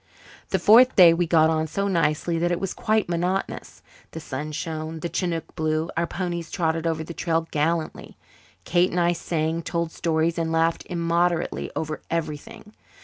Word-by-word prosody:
The - - +1
fourth 245 +4 +6
day 175 -3 +8
we 170 0 0
got 160 -1 +4
on 160 0 0
so 200 +6 -2
nicely 165 -2 0
that 175 +1 +1
it 175 - 0
was 195 - -3
quite 215 -1 0
monotonous. 175 +3 -3 0.3
The 160 - -5
sun 150 0 -5
shone, 160 +1 -5
the 170 - -3
chinook 165 -3 -3
blew, 155 +1 -1
our 170 +1 0
ponies 175 -3 -4
trotted 165 -1 -1
over 160 -1 -1
the 170 - -8
trail 165 -1 -1
gallantly. 160 +2 -2 0.5
Kate 175 +1 +3
and 180 - -1
I 175 0 +3
sang, 165 -1 -2
told 170 -1 -2
stories, 165 0 0
and 165 -1 -1
laughed 165 0 0
immoderately 170 0 0
over 155 -1 -4
everything. 165 +5 -5
165 Hz, 170 wpm, -24 LUFS, 160-175 Hz, 0.5 s, day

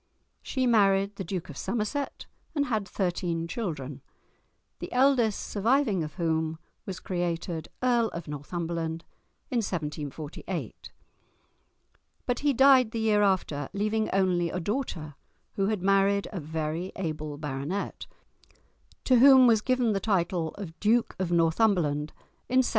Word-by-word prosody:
She 260 -1 -1
married 200 -3 +3
the 195 - -3
Duke 180 -1 -4
of 150 - -9
Somerset, 240 - -3 0.3
and 285 -1 +2
had 220 -6 -1
thirteen 175 -4 -2
children, 150 - -4 0.8
the - - -6
eldest 250 -5 +3
surviving 220 - +1
of 150 - -7
whom 160 -2 -1 0.3
was 190 -2 -5
created 170 -2 -3 0.2
Earl 240 -2 +3
of 170 -5 -7
Northumberland 165 +2 -4 0.5
in 250 - +1
1748. 155 - -4 1.3
But 245 -1 -1
he 290 0 +2
died 265 -2 +6
the 225 - -4
year 215 -2 +3
after, 180 -8 0
leaving 215 +2 0
only 180 -3 +2
a 180 - -3
daughter, 180 - -3 0.4
who 195 -1 0
had 210 -4 -1
married 195 +1 +3
a 195 - -4
very 160 +3 -3
able 155 -5 -4
baronet, 145 +6 -4 1.0
to 255 - +4
whom 260 +1 +8
was 225 -3 +5
given 250 -2 +1
the 195 - 0
title 180 -4 0
of 170 -5 -8
Duke 225 +3 +2
of 185 -2 -1
Northumberland 165 -3 +2 0.4
in 255 +1 +4
1766. - - -1
190 Hz, 135 wpm, -28 LUFS, 165-225 Hz, 1.3 s, whom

